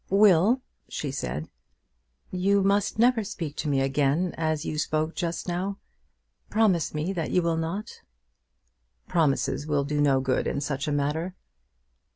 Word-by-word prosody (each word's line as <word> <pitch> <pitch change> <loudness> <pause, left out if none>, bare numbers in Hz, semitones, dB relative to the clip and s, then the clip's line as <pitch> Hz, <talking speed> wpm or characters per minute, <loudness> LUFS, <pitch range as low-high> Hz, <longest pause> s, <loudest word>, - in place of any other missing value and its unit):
"Will," 200 +5 +5 0.3
she 145 - -3
said, 75 - -4 0.8
"you 195 +2 +2
must 200 +2 +1
never 235 0 +4
speak 160 -6 -5
to 155 - -2
me 135 -1 +2
again 140 +6 +1
as 155 -2 -1
you 155 - -2
spoke 155 +1 0
just 170 -1 -3
now. 185 +3 -2 0.7
Promise 195 -9 +2
me 155 +6 -1
that 165 -4 -2
you 180 - +2
will 170 -1 +1
not." 170 +7 -4 1.1
"Promises 150 -3 +1
will 145 -2 +1
do 145 +1 -1
no 140 -2 +4
good 130 -1 0
in - - -1
such 140 0 -3
a - - 0
matter." 150 +5 -1
160 Hz, 150 wpm, -26 LUFS, 145-190 Hz, 1.1 s, Will